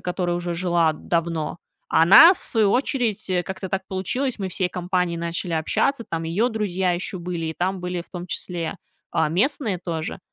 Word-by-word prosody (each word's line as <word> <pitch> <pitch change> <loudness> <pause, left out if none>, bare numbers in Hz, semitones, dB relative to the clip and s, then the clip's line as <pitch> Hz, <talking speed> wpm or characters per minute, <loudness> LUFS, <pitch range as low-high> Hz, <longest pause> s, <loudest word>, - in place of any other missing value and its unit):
которая 175 -1 -1
уже 175 0 -3
жила 170 -2 +2
давно. 165 0 -2 0.3
А 160 - +4
она, 320 - +9
в - - -16
свою 215 -4 +2
очередь, 245 -5 0
э, 180 -1 +1
как-то 190 +1 -6
так 190 +1 -2
получилось. 235 +8 -2
Мы 195 -2 -3
всей 185 0 -1
компанией 180 -1 -1
начали 170 +1 -3
общаться. 230 - 0
Там 165 -1 -2
её 190 +9 +1
друзья 190 -5 0
ещё 185 +2 -3
были, 175 -2 -4
и 160 - -4
там 185 +2 -1
были 180 0 -3
в 170 - -12
том 175 -1 -6
числе, 170 0 -3 0.3
а, - - +1
местные 210 - 0
тоже. 165 -2 -4
180 Hz, 185 wpm, -23 LUFS, 170-195 Hz, 0.3 s, она